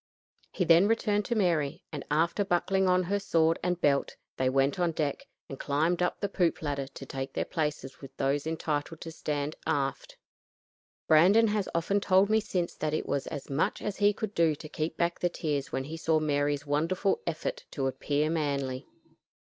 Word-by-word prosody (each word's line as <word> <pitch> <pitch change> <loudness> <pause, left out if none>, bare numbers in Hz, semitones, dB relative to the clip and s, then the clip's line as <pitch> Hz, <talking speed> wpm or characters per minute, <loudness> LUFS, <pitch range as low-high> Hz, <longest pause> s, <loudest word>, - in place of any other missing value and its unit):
He 180 - -1
then 170 +4 +6
returned 210 -2 +1
to 235 - -1
Mary, 165 -6 +1
and 150 -3 -5
after 165 +7 +2
buckling 190 +1 +1
on 185 0 +3
her 200 +3 0
sword 165 -4 +2
and 180 0 -1
belt 140 -3 +1 0.2
they 130 0 +2
went 135 +6 +1
on 175 -2 +1
deck 150 -3 -2 0.2
and 135 - -8
climbed 160 +5 0
up 180 - 0
the 200 - -1
poop 180 -5 0
ladder 140 -2 -2
to 135 - -10
take 135 0 -5
their - - -1
places 150 -4 -3
with 135 - -12
those 140 +2 0
entitled 160 0 -2
to 165 - -6
stand 150 -1 -3
aft. 135 -2 -2 0.9
Brandon 195 +9 +6
has 210 -2 -1
often 170 +5 +1
told 195 +1 +4
me 220 - +5
since 185 -5 -2
that 155 0 -2
it - - -2
was 140 - -2
as 145 -4 -6
much 140 +3 0
as 210 - -4
he 205 0 +4
could 215 0 -5
do 165 -4 +3
to 155 - -10
keep 155 +1 -3
back 170 0 0
the 175 - +1
tears 145 -5 -3
when 130 - -2
he 155 +4 -6
saw 160 -1 +2
Mary's 145 -1 0
wonderful 165 +7 0
effort 160 -2 -3
to 135 - -3
appear 145 +3 0
manly. 140 -5 -2
160 Hz, 190 wpm, -29 LUFS, 145-180 Hz, 0.9 s, then